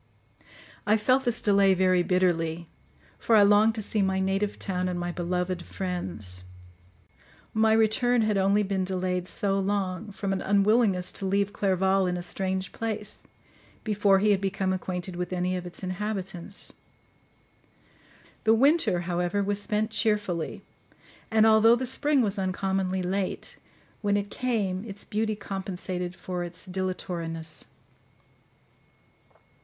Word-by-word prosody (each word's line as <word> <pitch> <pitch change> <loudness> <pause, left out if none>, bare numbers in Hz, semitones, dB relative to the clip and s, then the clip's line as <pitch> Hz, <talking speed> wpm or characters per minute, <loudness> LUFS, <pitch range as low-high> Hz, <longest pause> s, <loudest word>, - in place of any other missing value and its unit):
I 215 +1 +5
felt 255 +5 +2
this 240 -1 -1
delay 200 -2 +4
very 185 -1 +3
bitterly; 170 -2 0 0.5
for 230 - +3
I 210 - +7
longed 210 +2 +5
to 215 - -3
see 210 0 0
my 190 -1 +1
native 195 +2 0
town 185 -2 -2
and 180 -1 -3
my 175 0 -2
beloved 180 +1 -2
friends. 95 - -3 1.1
My 220 0 +4
return 225 +2 +3
had 215 -1 +1
only 195 +2 +3
been 190 -1 -1
delayed 185 -1 -2
so 195 0 -1
long, 195 +1 -2
from 195 0 -2
an 190 - -2
unwillingness 200 -2 +2
to 195 - -4
leave 200 +1 +1
Clerval 190 -1 +2
in 180 0 -1
a 175 - -5
strange 185 +1 -3
place, 215 -2 -4 0.6
before 205 -2 +3
he 210 +2 +3
had 195 -1 +2
become 190 -1 -1
acquainted 185 -1 -4
with 180 0 -4
any 180 0 -1
of 180 -1 -4
its 175 +2 -8
inhabitants. 190 -1 -5 1.7
The 220 0 +5
winter, 275 - +3
however, 175 +3 -1
was 205 +1 -1
spent 215 +1 -1
cheerfully; 210 -7 -1 0.7
and 220 -1 +4
although 220 +1 +6
the 255 +2 -2
spring 280 +1 +2
was 200 -2 -1
uncommonly 190 0 -1
late, 190 +1 -3 0.4
when 205 -1 +2
it 205 0 -3
came 210 -7 -1
its 205 -3 -8
beauty 215 0 -1
compensated 185 -2 -4
for 180 -1 -4
its 175 +1 -7
dilatoriness. 170 -4 -5
195 Hz, 140 wpm, -27 LUFS, 180-210 Hz, 1.7 s, I